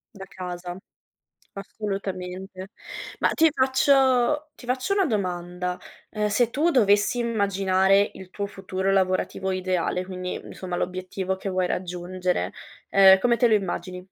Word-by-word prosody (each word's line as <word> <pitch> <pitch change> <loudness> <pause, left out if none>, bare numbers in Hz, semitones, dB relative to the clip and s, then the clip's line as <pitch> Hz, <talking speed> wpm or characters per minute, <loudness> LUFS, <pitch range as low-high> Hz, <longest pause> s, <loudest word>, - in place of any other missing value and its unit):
Da 195 - -8
casa, 180 -1 -6 0.8
assolutamente. 190 -2 -6 0.5
Ma - - +3
ti 325 -1 +4
faccio 265 +2 +3
ti 245 - -13
faccio 255 +10 0
una 390 -2 +3
domanda: 180 - -2 0.3
ehm, 210 -1 -1
se 230 +3 +2
tu 310 +7 +1
dovessi 210 -1 +3
immaginare 195 -3 +2
il 190 -1 -11
tuo 200 -1 -3
futuro 190 -1 -2
lavorativo 190 0 0
ideale, 185 -1 -1
quindi 185 -1 -5
insomma 180 -2 -6
l'obiettivo 185 +1 -3
che 195 - -4
vuoi 185 -1 0
raggiungere, 180 0 -2 0.4
ehm, 190 -1 +7
come 235 +3 +2
te 240 - +4
lo 225 - +3
immagini? 180 -2 -2
190 Hz, 130 wpm, -25 LUFS, 185-220 Hz, 0.8 s, ehm